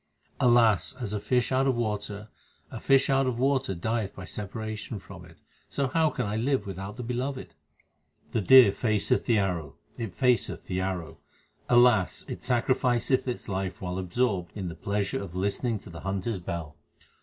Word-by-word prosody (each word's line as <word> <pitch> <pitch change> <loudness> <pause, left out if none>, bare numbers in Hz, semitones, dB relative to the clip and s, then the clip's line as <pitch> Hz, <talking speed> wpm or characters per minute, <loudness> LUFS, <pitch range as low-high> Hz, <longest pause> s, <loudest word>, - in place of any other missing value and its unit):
Alas! 110 -9 +4
as 110 -5 -3
a 105 - -1
fish 125 +3 0
out 130 +1 +2
of 130 - +2
water, 105 -2 -3 0.4
a - - -6
fish 135 0 +4
out 135 -1 +2
of 125 -2 -1
water 130 -5 +1
dieth 110 +3 -2
by 95 - -8
separation 110 +2 -5
from - - -11
it, - - -16 0.3
so 140 -2 -1
how 160 +2 +3
can - - -3
I 105 +1 -2
live 125 -1 0
without 95 +2 -6
the 125 - -5
Beloved? 125 +3 -4 0.8
The 115 - 0
deer 125 +1 +8
faceth 110 +3 +1
the 115 -3 +3
arrow, 85 -8 -1 0.2
it 115 -4 -3
faceth 125 +6 +1
the 90 0 -2
arrow, 85 -4 -4 0.5
alas! 120 -6 +4
it - - -7
sacrificeth 125 0 +1
its 125 - -4
life 95 -2 -3
while 90 0 -4
absorbed 95 -1 -1
in 95 -3 -3
the 85 - -7
pleasure 100 -1 -2
of 95 -3 -8
listening 100 +5 0
to 100 - -12
the 85 - -9
hunter 95 +4 -2
s 100 - -3
bell. 85 -4 -6
105 Hz, 180 wpm, -27 LUFS, 95-125 Hz, 0.8 s, deer